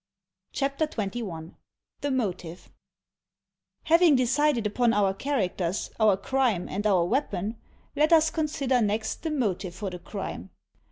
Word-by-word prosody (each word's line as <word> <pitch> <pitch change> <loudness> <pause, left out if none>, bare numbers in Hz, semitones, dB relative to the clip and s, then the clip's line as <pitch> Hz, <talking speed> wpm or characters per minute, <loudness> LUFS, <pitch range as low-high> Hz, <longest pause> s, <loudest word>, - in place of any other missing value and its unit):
CHAPTER 280 +3 -1
XXI 195 - -5 0.5
THE 285 - -1
MOTIVE 185 -9 -3 1.1
Having 330 -2 +5
decided 255 -1 +2
upon 230 +3 +2
our 200 -2 +2
characters, 195 -7 -2
our 215 -3 +4
crime, 245 -4 0
and 205 +3 -2
our 185 -4 +3
weapon, 210 -2 -1 0.4
let 305 +3 +3
us 320 -1 +5
consider 280 -5 0
next 215 +1 -1
the 325 - -2
motive 205 - -2
for 195 0 -4
the 180 - -7
crime. 175 - -6
220 Hz, 125 wpm, -27 LUFS, 190-275 Hz, 1.1 s, Having